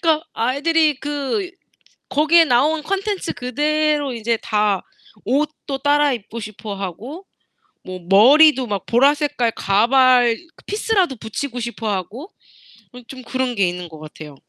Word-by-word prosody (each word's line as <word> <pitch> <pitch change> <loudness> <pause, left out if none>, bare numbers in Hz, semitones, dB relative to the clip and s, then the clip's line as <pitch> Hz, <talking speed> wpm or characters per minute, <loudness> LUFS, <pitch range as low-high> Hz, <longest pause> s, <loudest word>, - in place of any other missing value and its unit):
그러니까 320 -2 +1
아이들이 300 +5 +1
그 295 +6 -3 0.6
거기에 315 +4 +4
나온 300 +4 +1
콘텐츠 395 +3 -3
그대로 295 +1 -1
이제 230 0 -1
다 210 -3 0 0.4
옷도 280 +2 -2
따라 290 0 +2
입고 230 0 -6
싶어 215 -1 -7
하고, 215 - -7 0.6
뭐 185 0 -8
머리도 260 - +6
막 200 -3 -4
보라 270 +5 +4
색깔 290 -6 -1
가발 240 +4 +3 0.3
피스라도 400 -8 0
붙이고 245 +3 -6
싶어 230 -2 -4
하고 210 - -5 0.8
좀 260 +1 -10
그런 255 0 -2
게 195 -3 +2
있는 175 -1 -7
것 160 -1 -12
같아요. 155 -1 -11
255 Hz, 270 characters per minute, -19 LUFS, 220-300 Hz, 0.8 s, 머리도